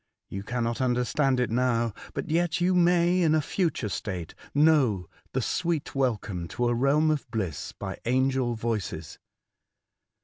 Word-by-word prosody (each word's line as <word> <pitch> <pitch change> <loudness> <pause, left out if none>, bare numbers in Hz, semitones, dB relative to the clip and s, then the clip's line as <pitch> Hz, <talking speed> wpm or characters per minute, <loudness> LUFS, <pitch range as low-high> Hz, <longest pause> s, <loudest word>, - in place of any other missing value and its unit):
You 100 - -5
cannot 120 +3 -2
understand 130 +2 +1
it 125 -2 0
now; 120 -2 +1 0.2
but - - -3
yet 170 +1 +1
you 180 +1 +2
may 175 0 +4
in 160 -2 +4
a - - +4
future 155 - -1
state 90 -5 -4 0.2
know 145 - +3 0.3
the - - 0
sweet 170 -4 -1
welcome 110 -10 -1
to 120 0 +2
a - - +2
realm 140 +6 +3
of 150 -5 -2
bliss 95 - -3
by - - -6
angel 130 0 +1
voices. 105 -9 -4
125 Hz, 145 wpm, -27 LUFS, 115-155 Hz, 0.3 s, may